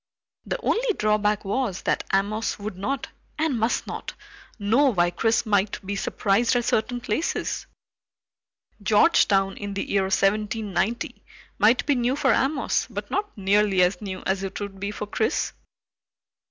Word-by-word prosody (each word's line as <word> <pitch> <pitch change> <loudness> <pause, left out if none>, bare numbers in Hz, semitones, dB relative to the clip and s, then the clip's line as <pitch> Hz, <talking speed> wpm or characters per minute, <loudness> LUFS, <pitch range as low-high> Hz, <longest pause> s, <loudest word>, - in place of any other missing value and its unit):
The - - -2
only 465 -1 +1
drawback 210 -1 +1
was 205 -2 -1
that - - 0
Amos 205 +3 0
would 205 -1 -6
not, 205 +9 -3 0.3
and 305 -6 0
must 225 +3 0
not, - - -6 0.4
know 230 +7 +3
why 175 -4 +2
Chris 225 +5 +1
might 205 -2 +1
be 200 +1 -3
surprised 210 +4 +1
at 240 -1 +1
certain 245 +3 0
places. 240 +7 -2 1.1
Georgetown 200 - +4
in 205 -1 -5
the 195 - -3
year 200 - +2
1790 210 +2 0 0.4
might 225 +5 +4
be 290 - +3
new 250 0 +1
for 295 - +3
Amos, 275 +2 +1
but - - -6
not 410 - -2
nearly 200 -1 +3
as 180 +4 +1
new 190 -3 -6
as 190 0 0
it 195 -1 -5
would 200 -1 -6
be 200 +1 -3
for 210 0 -5
Chris. 205 - -1
210 Hz, 150 wpm, -25 LUFS, 195-240 Hz, 1.1 s, Georgetown